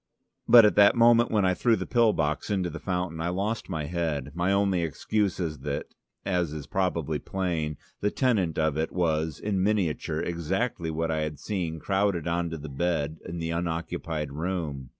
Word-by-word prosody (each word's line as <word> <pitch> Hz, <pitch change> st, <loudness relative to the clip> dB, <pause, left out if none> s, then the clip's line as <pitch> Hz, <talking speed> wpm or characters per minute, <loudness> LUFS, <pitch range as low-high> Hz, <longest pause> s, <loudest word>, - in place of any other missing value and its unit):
But 120 Hz, -2 st, +9 dB
at 105 Hz, -, +3 dB
the 100 Hz, 0 st, +7 dB
moment 120 Hz, 0 st, +5 dB
when 105 Hz, -3 st, +2 dB
I 90 Hz, -, +3 dB
threw 115 Hz, +4 st, +3 dB
the -, -, -4 dB
pill 120 Hz, -3 st, +4 dB
box 75 Hz, -5 st, -1 dB
into 95 Hz, -4 st, 0 dB
the 85 Hz, -, -6 dB
fountain, 90 Hz, -3 st, -2 dB
I 85 Hz, -, -1 dB
lost 100 Hz, +5 st, -2 dB
my 80 Hz, -4 st, -2 dB
head: 75 Hz, -4 st, -2 dB
my 90 Hz, +3 st, 0 dB
only 100 Hz, -2 st, +2 dB
excuse 95 Hz, +5 st, -1 dB
is 80 Hz, -5 st, -3 dB
that, 70 Hz, +1 st, -4 dB, 0.3 s
as 90 Hz, -5 st, 0 dB
is 75 Hz, -2 st, -6 dB
probably 85 Hz, -6 st, -1 dB
plain, 85 Hz, -6 st, -2 dB, 0.2 s
the 105 Hz, -, +1 dB
tenant 105 Hz, -, +1 dB
of 80 Hz, -1 st, +1 dB
it 80 Hz, -, -1 dB
was, 80 Hz, -3 st, 0 dB
in 100 Hz, -3 st, -1 dB
miniature, 95 Hz, -5 st, 0 dB
exactly 85 Hz, +2 st, -2 dB
what 80 Hz, +1 st, -1 dB
I 80 Hz, -1 st, 0 dB
had 75 Hz, -1 st, -3 dB
seen 85 Hz, -2 st, -3 dB
crowded 95 Hz, -2 st, 0 dB
on 85 Hz, 0 st, 0 dB
to 80 Hz, -, -5 dB
the 75 Hz, 0 st, -8 dB
bed 80 Hz, +1 st, -1 dB
in 85 Hz, -, -5 dB
the 80 Hz, 0 st, -3 dB
unoccupied 85 Hz, -2 st, -3 dB
room. 75 Hz, -5 st, -3 dB
85 Hz, 190 wpm, -27 LUFS, 80-95 Hz, 0.3 s, But